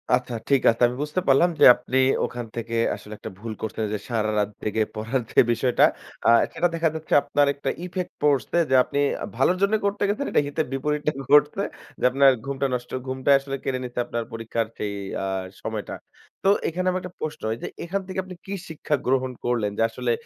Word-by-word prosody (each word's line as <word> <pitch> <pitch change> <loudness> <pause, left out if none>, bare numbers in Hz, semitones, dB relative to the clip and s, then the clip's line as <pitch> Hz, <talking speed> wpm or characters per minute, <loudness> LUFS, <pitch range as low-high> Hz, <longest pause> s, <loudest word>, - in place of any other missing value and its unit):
আচ্ছা, 125 -1 -4 0.2
ঠিক 135 -2 +4
আছে 115 - -8
আমি 125 - -4
বুঝতে 150 +5 -2
পারলাম 140 +6 +5
যে - - +7
আপনি 125 +1 -3 0.3
ওখান 120 0 -5
থেকে 115 0 -4 0.2
আসলে 105 - -11
একটা - - -7
ভুল 110 +1 -5
করছেন 110 0 -3
যে - - 0
সারারাত 105 -2 0
জেগে 110 +1 0
পড়ার 115 +4 -1
যে - - +4
বিষয়টা 125 +1 +2 0.4
আ - - +7 0.2
সেটা 175 - +2
দেখা 165 -1 +2
যাচ্ছে 160 0 -4
আপনার 145 -1 +2
একটা 140 -1 -3
ইফেক্ট 180 0 -4
পড়সে 145 0 +2
যে 130 - +4
আপনি 140 - -3 0.4
ভালোর 135 +9 +2
জন্যে 200 +2 +3
করতে 200 0 0
গেছেন 265 +8 -1
এটা - - +4
হিতে 145 - -1
বিপরীতটা 150 +2 0 0.2
ঘটসে 150 +6 +5 0.4
যে - - -8
আপনার 135 +1 +6
ঘুমটা 140 0 -1
নষ্ট। 125 0 -3 0.2
ঘুমটাই 130 +2 +3
আসলে 135 0 -5
কেড়ে 130 -1 -1
নিছে 125 0 -5
আপনার 120 -1 -3
পরীক্ষার 115 0 -2
যে - - -4 0.4
আ - - -1 0.4
সময়টা। - - -4 0.5
তো 195 - +4 0.2
এখানে 185 +3 -2
আমার 185 - -1
একটা 180 -1 -8
প্রশ্ন 155 -1 -4
এইযে - - -6 0.2
এখান 195 +4 -2
থেকে 190 0 -4
আপনি 185 0 -10
কি 195 - -5 0.2
শিক্ষা 155 -1 -1
গ্রহণ 130 0 +1
করলেন 115 -4 0
যে - - 0
আসলে 120 +1 -2
135 Hz, 195 wpm, -24 LUFS, 120-160 Hz, 0.5 s, যে